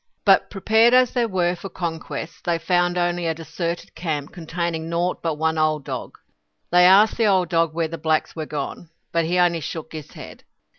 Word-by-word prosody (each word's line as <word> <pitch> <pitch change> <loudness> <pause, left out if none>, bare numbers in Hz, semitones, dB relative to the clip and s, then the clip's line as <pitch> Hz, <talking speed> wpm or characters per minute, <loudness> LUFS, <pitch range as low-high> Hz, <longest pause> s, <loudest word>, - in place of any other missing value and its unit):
But - - +5
prepared 220 +4 +3
as 255 -1 +4
they 240 -2 +1
were 180 -4 0
for 195 +3 -8
conquest, 160 -3 -6
they 170 -1 +1
found 175 +1 +1
only 175 -1 0
a 160 - -1
deserted 165 +2 -5
camp 155 -4 -4
containing 165 -1 -4
naught 175 +2 -1
but 165 -2 -1
one 160 +1 0
old 155 -2 +1
dog. - - -6 0.5
They 180 0 +6
asked 200 +4 +6
the 225 - +3
old 185 -4 +2
dog 165 -1 +1
where 165 -1 0
the 165 0 -7
blacks 155 0 0
were 155 -2 -5
gone. 150 +3 -5 0.2
But 165 -1 +1
he 175 +2 0
only 175 -2 +3
shook 160 +1 -6
his 155 -2 -9
head. - - -11
170 Hz, 195 wpm, -22 LUFS, 160-180 Hz, 0.5 s, They